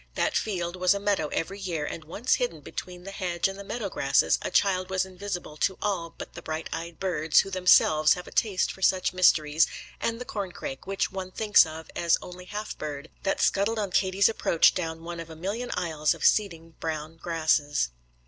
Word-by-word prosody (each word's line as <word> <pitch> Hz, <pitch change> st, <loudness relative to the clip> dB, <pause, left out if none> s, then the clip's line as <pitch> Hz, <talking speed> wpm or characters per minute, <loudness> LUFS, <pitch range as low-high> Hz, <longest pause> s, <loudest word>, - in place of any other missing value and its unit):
That -, -, 0 dB
field 175 Hz, -4 st, -1 dB
was 185 Hz, +2 st, +3 dB
a -, -, -2 dB
meadow 200 Hz, -6 st, +1 dB
every 190 Hz, +7 st, -3 dB
year, 170 Hz, -6 st, -2 dB
and 160 Hz, -, -6 dB
once 215 Hz, +10 st, 0 dB
hidden -, -, -2 dB
between 180 Hz, -1 st, -7 dB
the 195 Hz, -, -7 dB
hedge 180 Hz, -3 st, -1 dB
and 195 Hz, +1 st, -7 dB
the -, -, -6 dB
meadow 215 Hz, +1 st, -4 dB
grasses -, -, +2 dB
a -, -, -3 dB
child 185 Hz, -2 st, +2 dB
was 190 Hz, 0 st, +1 dB
invisible 185 Hz, -4 st, -6 dB
to 190 Hz, +4 st, 0 dB
all 180 Hz, -5 st, -2 dB
but -, -, -8 dB
the -, -, -8 dB
bright 160 Hz, 0 st, -4 dB
eyed 170 Hz, 0 st, -6 dB
birds, 160 Hz, -5 st, +3 dB
who 195 Hz, -, -8 dB
themselves 155 Hz, -4 st, +5 dB
have 180 Hz, -, -8 dB
a -, -, -12 dB
taste 200 Hz, -5 st, +1 dB
for 190 Hz, -, -13 dB
such 185 Hz, -1 st, +2 dB
mysteries, 160 Hz, -4 st, +4 dB, 0.3 s
and 230 Hz, 0 st, -1 dB
the 250 Hz, -, -6 dB
corn 200 Hz, -6 st, -4 dB
crake, 135 Hz, +6 st, -7 dB
which 195 Hz, 0 st, -1 dB
one 190 Hz, -1 st, -5 dB
thinks 210 Hz, -2 st, +5 dB
of 160 Hz, +1 st, -9 dB
as 170 Hz, -1 st, +3 dB
only 180 Hz, 0 st, -10 dB
half 210 Hz, +3 st, -5 dB
bird, 150 Hz, 0 st, -6 dB
that 195 Hz, -, -1 dB
scuttled 205 Hz, +3 st, +2 dB
on 205 Hz, -3 st, -2 dB
Katie's 190 Hz, +2 st, +3 dB
approach 210 Hz, -6 st, +3 dB
down 165 Hz, -2 st, -4 dB
one 170 Hz, 0 st, -6 dB
of 165 Hz, 0 st, -7 dB
a 160 Hz, -, -9 dB
million 205 Hz, +9 st, -4 dB
aisles 160 Hz, -4 st, 0 dB
of -, -, -4 dB
seeding 165 Hz, -6 st, +2 dB
brown 160 Hz, 0 st, -4 dB
grasses. 155 Hz, -, +1 dB
180 Hz, 205 wpm, -27 LUFS, 160-195 Hz, 0.3 s, themselves